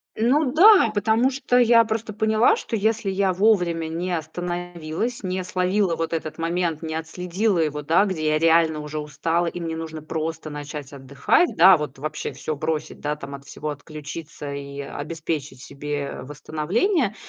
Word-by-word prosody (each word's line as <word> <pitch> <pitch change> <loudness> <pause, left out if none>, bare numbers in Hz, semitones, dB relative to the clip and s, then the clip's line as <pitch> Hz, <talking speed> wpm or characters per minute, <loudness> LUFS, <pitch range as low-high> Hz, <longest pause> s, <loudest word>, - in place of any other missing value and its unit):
Ну, 255 +5 +2
да. 380 - +7
Потому 220 +4 +2 0.2
я 240 -2 +6
просто 220 0 -3
поняла, 220 - +3
что 255 - -4
если 220 0 0
я 190 0 +1
вовремя 180 -4 +2
не 170 +3 -3
остановилась, 175 +6 -4
не 185 0 -2
словила 185 0 +1
вот 165 0 -3
этот 155 -1 -4
момент, 170 -1 -1
не 160 -1 -4
отследила 180 +5 -1
его, 150 -2 0
да, 165 +7 +4
где 180 -6 -3
я 155 0 +3
реально 165 -1 +4
уже 150 0 -6
устала 165 +3 -1
и 170 +1 -4
мне 165 -1 -3
нужно 160 -1 -6
просто 160 0 -4
начать 145 -1 -7
отдыхать, 140 - +1
да, 180 +2 +8
вот 145 -3 -6
вообще 155 +2 -4
всё 155 - -4
бросить, 155 +1 -3
да, 150 0 -2
там, 140 -1 -8
от 140 0 -13
всего 150 +2 -6
отключиться 150 0 -7
и 140 0 -6
обеспечить 150 -1 -5
себе 140 +1 -5
восстановление, 195 - -1
165 Hz, 160 wpm, -23 LUFS, 150-195 Hz, 0.2 s, да